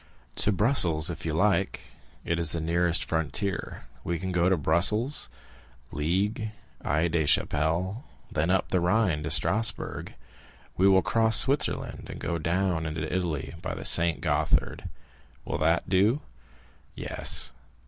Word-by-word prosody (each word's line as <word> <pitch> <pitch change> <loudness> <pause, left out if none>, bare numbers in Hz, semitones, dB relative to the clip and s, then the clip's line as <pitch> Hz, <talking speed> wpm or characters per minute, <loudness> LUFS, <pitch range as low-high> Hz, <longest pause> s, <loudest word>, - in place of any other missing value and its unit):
"To 105 - +3
Brussels, 90 - +2
if - - -6
you - - -1
like; - - +1 0.4
it 85 0 -1
is 85 -2 0
the 85 - -1
nearest 85 +1 +1
frontier. 80 +4 -2 0.2
We 85 0 -2
can 95 +2 -4
go 90 0 +2
to 95 - +2
Brussels, 100 - +2 0.6
Liège, 100 +8 -1 0.3
Aix 80 +4 0
la 80 -2 +2
Chapelle; 85 - 0 0.3
then 80 +3 0
up 95 +1 +1
the 90 - +1
Rhine 90 -3 +1
to 80 - -4
Strasbourg. 110 - 0 0.6
We 95 - +3
will 95 -1 +5
cross 110 -1 +3
Switzerland, 135 +4 +1
and - - -7
go 85 -1 -2
down 85 0 0
into 80 +2 -3
Italy 80 -7 -2
by - - -4
the - - -7
Saint 85 -6 +3
Gothard. - - 0 0.6
Will - - -3
that 80 +2 +1
do?" 105 +10 +2 0.7
"Yes." - - +1
85 Hz, 140 wpm, -27 LUFS, 80-100 Hz, 0.7 s, will